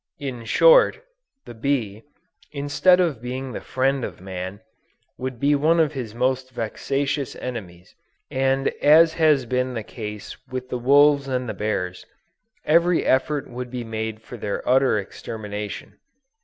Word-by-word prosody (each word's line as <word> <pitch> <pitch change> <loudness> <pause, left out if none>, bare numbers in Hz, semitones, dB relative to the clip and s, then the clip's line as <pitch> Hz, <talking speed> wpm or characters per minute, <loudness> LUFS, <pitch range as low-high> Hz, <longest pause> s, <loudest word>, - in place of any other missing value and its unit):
In 125 -5 -6
short, - - +5 0.5
the - - -9
bee, 115 -4 -2 0.5
instead 145 +5 +3
of 160 -10 0
being 130 +2 -5
the - - -6
friend 135 0 0
of - - -6
man, 95 +2 -6 0.6
would 130 -2 -5
be 145 +3 +3
one 155 +4 +3
of 155 -2 +2
his 120 -6 -6
most 130 +1 0
vexatious 135 +4 -2
enemies, 95 -8 -8 0.4
and 135 +1 +1
as 160 +2 +6
has 155 -5 +3
been 125 +1 -1
the 115 - -3
case 105 -2 -7
with 130 0 -6
the 125 - -3
wolves 140 +2 +5
and 130 -1 -2
the 110 - -3
bears, 90 -3 -3 0.6
every 170 +2 +3
effort 140 +2 +1
would 125 0 -7
be 125 -1 -5
made 110 -1 -5
for 125 - -9
their 100 -2 -4
utter 130 -2 +4
extermination. 105 0 -6
130 Hz, 145 wpm, -23 LUFS, 110-140 Hz, 0.6 s, as